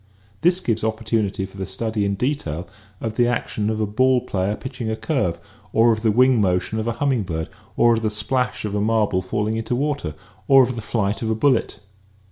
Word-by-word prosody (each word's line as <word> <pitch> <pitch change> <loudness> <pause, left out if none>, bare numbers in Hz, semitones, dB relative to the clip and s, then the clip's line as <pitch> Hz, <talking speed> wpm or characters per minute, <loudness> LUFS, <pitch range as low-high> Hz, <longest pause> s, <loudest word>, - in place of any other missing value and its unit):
This 175 +2 +3
gives 115 -8 0
oppor 110 0 -2
tunity 105 -3 0
for 95 - -15
the 95 - -4
study 105 +2 -2
in 100 0 0
detail 95 - -2 0.3
of 110 -1 -4
the 120 -1 +4
action 110 -3 -1
of 110 0 -1
a 110 - +1
ball 130 +5 +3
player 100 -3 -1
pitching 130 -2 -5
a 110 - -1
curve 110 - -1 0.3
or 115 +1 +5
of 110 - -4
the 110 - +2
wing 125 +1 +4
motion 95 +3 0
of 110 - -2
a 115 - 0
humming 130 -1 +1
bird 80 -4 -4 0.3
or 120 0 +5
of 115 - 0
the 110 - +1
splash 110 +4 -1
of 105 - -3
a 105 - 0
marble 105 -3 +2
falling 105 +4 -1
into 115 +2 -2
water 140 - -2 0.3
or 135 -1 +7
of 125 0 -1
the 115 - -4
flight 105 -1 -1
of 115 - -1
a 110 - +1
bullet. 130 +1 +1
110 Hz, 220 wpm, -22 LUFS, 100-125 Hz, 0.3 s, or